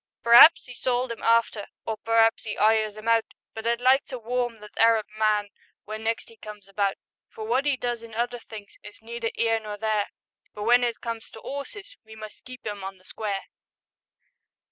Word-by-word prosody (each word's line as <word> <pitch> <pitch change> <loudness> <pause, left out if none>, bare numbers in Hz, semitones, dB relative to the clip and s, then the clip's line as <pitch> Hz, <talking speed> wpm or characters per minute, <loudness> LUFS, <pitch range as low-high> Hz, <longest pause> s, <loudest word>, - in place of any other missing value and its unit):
Per'aps 240 +8 +8
'e 245 - -9
sold 250 0 -1
'im 230 - -7
after, 230 -2 +2 0.2
Or 220 - -2
per'aps 225 0 +2
'e 210 - -4
'ires 215 -1 +2
'im 215 +1 -9
out, 230 -1 +2 0.2
But 220 +1 -5
I'd 235 0 +1
like 260 +2 +4
to 255 - -6
warm 240 0 -2
that 210 - -13
Arab 225 -1 +4
man 210 -1 +1 0.4
Wen 215 +1 -6
next 225 +1 -2
'e 225 - -18
comes 210 -2 -11
about; 195 0 0 0.3
For 220 - -9
wot 255 +6 +1
'e 280 -2 +2
does 240 -2 -3
in 230 -1 -11
other 240 +1 -2
things 215 -3 -12
Is 210 +1 -14
neither 230 0 -4
'ere 225 -1 +2
nor 210 -1 -7
there, 215 -1 0 0.5
But 210 - -7
w'en 240 +3 +4
it 235 -1 -2
comes 230 -1 -5
to - - -12
'orses 390 - -8
We 220 0 -13
must 215 -1 -11
keep 255 0 -11
'im 205 -2 -5
on 195 0 -6
the 185 - -25
square. 200 -1 -4
225 Hz, 200 wpm, -26 LUFS, 215-240 Hz, 0.5 s, Per'aps